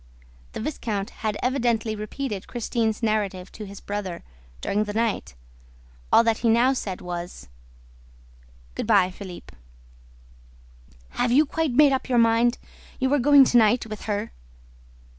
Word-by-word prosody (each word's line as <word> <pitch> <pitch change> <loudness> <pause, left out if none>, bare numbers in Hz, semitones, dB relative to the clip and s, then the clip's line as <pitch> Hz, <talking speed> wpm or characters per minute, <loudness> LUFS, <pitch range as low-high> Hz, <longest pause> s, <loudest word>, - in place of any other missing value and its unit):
The - - -5
viscount 220 -6 -3
had 215 -2 -1
evidently 235 -4 0
repeated 215 0 -5
Christine's 230 -2 -2
narrative 200 -4 -1
to 210 -2 -9
his 200 0 -10
brother, 200 -4 -5 0.4
during 210 - -1
the 205 0 -6
night. 225 - -1 0.8
All - - +6
that 225 -1 +1
he 230 - +1
now 240 +4 +4
said 195 -8 -5
was: 175 - -7 1.2
"Good - - -4
by, 195 -4 +4
Philippe." 180 - -10 1.5
"Have 245 -1 -1
you 290 +5 +5
quite 315 -1 -1
made 290 +2 +6
up 265 0 -2
your 245 - +2
mind? 230 +1 +3 0.4
You 260 +1 +1
are 290 - +3
going 280 +1 +7
to 245 - +3
night? 225 +2 +3
With 215 -2 -8
her?" 210 +1 -2
225 Hz, 140 wpm, -24 LUFS, 205-245 Hz, 1.5 s, going